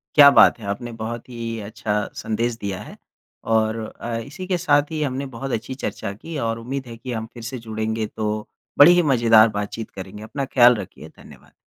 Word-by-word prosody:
क्या 145 -2 +10
बात - - +6
है। 110 - -9
आपने 120 +4 -4
बहुत 115 +2 -5
ही 115 -2 -5
अच्छा 105 0 -2
संदेश 115 +2 -2
दिया 100 -2 -4
है। - - -11 0.6
और 110 0 +1 0.2
अ, 115 -1 -3
इसी 150 +11 -7
के 180 -1 +1
साथ 145 -3 +2
ही 155 -1 -3
हमने 135 0 -2
बहुत 135 +3 -5
अच्छी 120 +3 -3
चर्चा 100 -5 -4
की 155 +10 -8
और 115 0 -2
उम्मीद 130 +3 -5
है 115 - -8
कि 125 +2 -7
हम 110 -1 -3
फिर 120 - -10
से 115 +3 -5
जुड़ेंगे 110 0 -2
तो, 105 0 -3 0.3
बड़े 145 +4 +10
ही 175 0 +5
मज़ेदार 115 -2 +6
बातचीत 105 +2 -5
करेंगे। 95 +2 -9
अपना 135 +5 -4
ख़याल 125 -2 +6
रखिए 105 - -8
धन्यवाद। - - -17
115 Hz, 200 wpm, -22 LUFS, 110-135 Hz, 0.6 s, क्या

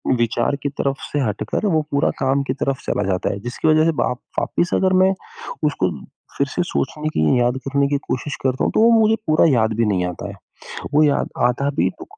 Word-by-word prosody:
विचार 120 +4 0
की 140 - 0
तरफ़ 140 0 -3
से 145 - 0
हटकर 105 - -2
वो 155 - +3
पूरा 140 - +2
काम 135 +1 +2
की 130 - 0
तरफ़ 135 0 -2
चला - - 0
जाता 95 -2 0
है 100 - -6
जिसकी 120 +8 -3
वज़ह 155 0 +5
से 165 - +3
वाप 125 - -1 0.2
वापिस 175 - -1
अगर 185 0 +2
मैं 190 +1 +4 0.5
उसको 95 -11 0 0.5
फिर 140 - +1
से 160 - -1
सोचने 155 -3 -2
की 80 +11 +2
याद 120 +1 +1
करने 140 0 +2
की 145 - 0
कोशिश 140 +3 -3
करता 130 0 0
हूँ - - +1
तो - - +4
वो 230 - +6
मुझे 220 0 +4
पूरा 155 0 +4
याद 110 -4 +2
भी 115 - +3
नहीं 95 -4 +1
आता 90 -1 -5
है। - - -9 0.6
वो 150 +1 +4
याद 145 - +1 0.2
आधा 140 +3 -1
भी - - +3
तो - - -6
140 Hz, 220 wpm, -20 LUFS, 120-150 Hz, 0.6 s, वो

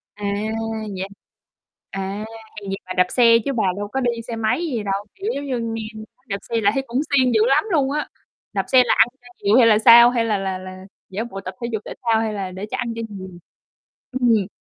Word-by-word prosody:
À, 205 0 -6 0.7
vậy 190 +1 -3 0.8
à, 195 +2 -4 0.4
vậy 195 - -2
bà 185 - -5
đạp 180 - +5
xe 230 -2 +6
chứ 275 - 0
bà 230 - 0
đâu 205 0 -3
có 265 +6 -3
đi 245 -2 +1 0.2
xe 235 - -4
máy 225 +9 0
gì 245 -9 -2
đâu, 200 0 -2
kiểu, 395 +3 -3
giống 240 -5 -2
như, 225 - -3
nghe 215 0 -8
nói 255 - -37
đạp 200 - -1
xe 230 -1 -2
là 205 -1 +4
thấy 270 - -1
cũng 245 +4 0
siêng 260 -3 +3
dữ 220 - +4
lắm 275 +3 +4
luôn 280 -5 +2
á. 300 +1 -2 0.5
Đạp - - -1
xe 255 -1 +6
là - - +3
ăn - - +7
cho 245 - -17 0.2
nhiều 205 +4 +4
hay 240 -3 +7
là 215 -2 +5
sao? 235 +2 +9
Hay 240 -2 0
là 215 -2 +1
là 190 -1 -2
là 185 0 -10 0.2
giả 200 +4 -3
bộ 195 -5 -7
tập 185 -1 -7
thể 235 - -2
dục 220 - -1
thể - - -6
thao 225 -2 +2
hay 220 -1 -2
là 195 -3 -4
để 190 +3 -6
cho - - -2
ăn 235 -2 -2
cho 230 - -4
nhiều? 190 -2 -8 0.8
Ừm 250 -1 +1
hừm. 215 -5 +3
225 Hz, 245 wpm, -21 LUFS, 200-245 Hz, 0.8 s, sao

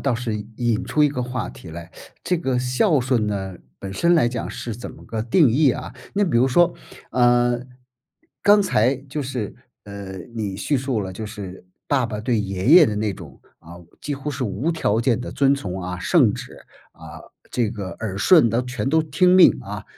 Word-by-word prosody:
倒 140 -3 0
是 115 -2 -3 0.2
引 120 -3 0
出 150 - +1
一 - - +4
个 130 -3 -3
话 125 +1 -4
题 - - -13
来。 85 +1 -9 0.3
这 180 - 0
个 130 -6 -1
孝 130 - +2
顺 125 -4 0
呢， 95 -3 -4 0.2
本 95 -1 -7
身 170 - +2
来 160 -8 +4
讲 120 -1 -3
是 115 - -6
怎 120 - -8
么 - - -14
个 110 -1 -4
定 130 +4 +4
义 140 +3 +4
啊？ - - -6 0.2
那 205 - +2
比 155 -11 +1
如 130 - +3
说， 175 +6 +4 0.4
啊， 120 -1 +3 0.9
刚 205 0 +6
才 130 - +2
就 140 +2 -6
是， 125 -6 -4 0.3
嗯， 100 -1 -9
你 105 -4 -3
叙 140 +6 0
述 130 -4 -2
了 95 - -6
就 110 +3 -6
是 100 -4 -9 0.2
爸 135 -4 +1
爸 105 -2 -5
对 115 -1 0
爷 95 +1 -3
爷 165 +1 +8
的 105 -3 -2
那 105 -1 -1
种， 75 -8 -12 0.2
啊， 85 +2 -13 0.2
几 145 - -3
乎 140 +2 -5
是 130 -2 -3
无 125 +10 -1
条 115 -9 0
件 120 0 +1
的 - - -6
遵 140 0 +3
从 95 -8 -5
啊， 90 0 -5
圣 - - +3
旨， - - -8 0.4
啊， - - -12 0.3
这 120 -3 0
个 100 -5 -6
耳 105 -4 -4
顺 150 - +5
的 115 +3 0
全 130 +1 -3
都 160 +2 +3
听 170 +5 +3
命 175 - +7
啊。 - - -7
120 Hz, 220 characters per minute, -22 LUFS, 105-140 Hz, 0.9 s, 爷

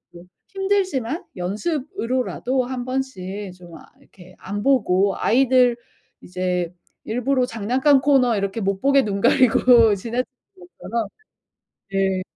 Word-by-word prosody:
네 170 - -11 0.3
힘들지만 380 - -1
연습으로라도 255 - -2
한번씩 245 -7 -5
좀 175 -2 -14
아 - - -15 0.2
이렇게 185 -1 -18
안 205 +1 -5
보고 200 -8 +2
아이들 250 0 +3 0.4
이제 180 -1 -3 0.3
일부러 250 +3 0
장난감 255 +5 +2
코너 260 -4 +3
이렇게 200 +2 -2
못 195 0 -1
보게 275 0 +4
눈 200 -1 -3
가리고 240 -2 +5
지나치는 235 +5 -2 0.4
것처럼 235 - -5 0.8
네 195 -1 0
235 Hz, 255 characters per minute, -22 LUFS, 195-265 Hz, 0.8 s, 가리고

